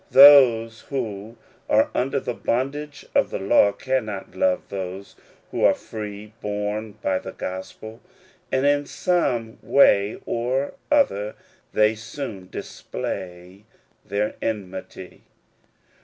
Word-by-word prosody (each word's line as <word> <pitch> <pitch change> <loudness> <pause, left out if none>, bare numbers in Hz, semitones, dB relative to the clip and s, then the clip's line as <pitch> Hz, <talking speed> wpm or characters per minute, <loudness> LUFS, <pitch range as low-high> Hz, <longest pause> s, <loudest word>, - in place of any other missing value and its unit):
Those 125 -5 +7
who 115 -4 -4 0.3
are 110 +1 +3
under 135 +2 0
the 125 - -4
bondage 145 +5 -3
of - - +3
the - - -3
law 100 +1 +4
cannot 110 -6 -3
love 95 0 +1
those 95 0 -6 0.4
who - - -2
are - - +6
free 105 -1 -8
born 105 +1 -3
by 95 -1 +1
the - - -8
gospel, 110 +5 -7 0.5
arid 130 +1 +1
in 145 0 +3
some 120 -11 0
way 105 -6 +4
or 125 +4 -1 0.2
other 105 - +2 0.4
they 105 0 +4
soon 110 -4 -7
display 90 +7 -6 0.4
their 105 +1 -1
enmity. 95 -3 -5
110 Hz, 110 wpm, -23 LUFS, 100-130 Hz, 0.5 s, Those